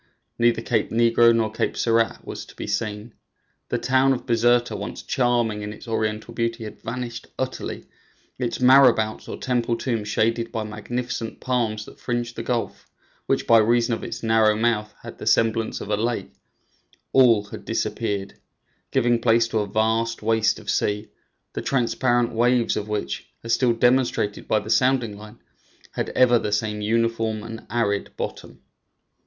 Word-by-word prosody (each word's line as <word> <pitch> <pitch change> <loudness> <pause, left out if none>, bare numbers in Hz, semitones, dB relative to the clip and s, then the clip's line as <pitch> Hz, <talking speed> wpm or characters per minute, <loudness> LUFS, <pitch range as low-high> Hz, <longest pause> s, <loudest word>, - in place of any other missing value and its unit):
Neither 120 -1 +3
Cape - - 0
Negro 115 0 +4
nor 110 -1 +1
Cape 110 - -2
Serrat 115 -1 +1
was - - -6
to - - -15
be - - -6
seen. 105 0 -3 0.6
The - - 0
town 130 +1 +3
of 125 - -5
Bizerta, 120 0 +2
once - - -6
charming 120 -4 +1
in 105 0 -5
its 110 - -11
oriental 110 0 -2
beauty, 115 0 -2
had 105 - -9
vanished 120 -1 -5
utterly; - - -4 0.5
its 120 -2 -2
marabouts, 125 -4 +5
or - - -5
temple 120 -2 0
tombs, 115 -4 -2
shaded 115 +2 0
by 110 - -2
magnificent 115 +2 -5
palms 115 -4 -1
that - - -14
fringed 120 -1 -3
the - - -4
gulf, 120 -2 -3 0.4
which - - +1
by 115 -1 +6
reason 115 +2 +2
of 115 - -4
its - - -6
narrow 110 -1 +4
mouth 110 -1 0
had - - -10
the - - -6
semblance 115 0 +1
of 105 - -6
a - - +3
lake, 115 +3 -2 0.8
all 120 -6 +5
had 105 - -10
disappeared, 100 -1 -2 0.6
giving 120 -2 +2
place 115 0 +3
to 110 - 0
a 105 - -1
vast 110 +2 0
waste 110 0 +2
of - - -13
sea, 105 +1 -1 0.4
the - - -3
transparent 120 -1 +1
waves 120 +1 +2
of 105 - -3
which, 105 -11 -4
as 115 0 -1
still 120 0 +3
demonstrated 120 -3 +1
by 110 - +2
the 105 +1 -3
sounding 125 -4 +2
line, 105 +2 -12 0.5
had - - -3
ever 120 -2 +5
the 105 - -3
same 105 0 -1
uniform 115 0 0
and 115 -1 -9
arid 100 -3 0
bottom. - - -6
115 Hz, 165 wpm, -23 LUFS, 110-120 Hz, 0.8 s, by